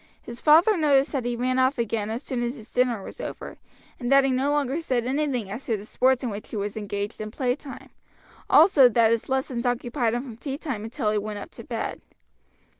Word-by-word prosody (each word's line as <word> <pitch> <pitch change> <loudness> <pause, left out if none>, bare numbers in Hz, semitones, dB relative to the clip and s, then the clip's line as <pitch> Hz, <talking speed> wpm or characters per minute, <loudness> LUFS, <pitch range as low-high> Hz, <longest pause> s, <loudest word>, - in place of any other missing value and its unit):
His 235 0 -10
father 335 +7 +6
noticed 285 -3 +3
that 265 -5 -2
he 240 0 -1
ran 255 +2 0
off 260 +2 +2
again 225 -2 -1
as 230 +5 -4
soon 250 -2 -3
as 240 +2 -2
his 225 -4 -14
dinner 245 -5 +1
was - - -9
over, - - -7 0.4
and 245 0 -3
that 275 0 +7
he 270 - +1
no 260 +2 +1
longer 290 +1 0
said 250 -6 -1
anything 260 -6 -1
as 230 +6 -6
to 225 -3 0
the 205 - -10
sports 255 +3 +2
in 240 - -2
which 205 +1 -7
he - - -7
was 205 0 -3
engaged 205 -1 -4
in 215 - -4
playtime; 255 +3 -4 0.6
also, 300 -6 +7
that 230 -1 +3
his 230 +2 -1
lessons 265 -2 -1
occupied 245 -1 0
him 245 - -2
from 240 -5 -9
tea 275 +2 -5
time 265 -9 -4
until 225 -1 -2
he 210 - +1
went 210 0 -5
up 205 - -8
to - - -11
bed. - - -4
245 Hz, 225 wpm, -25 LUFS, 225-270 Hz, 0.6 s, that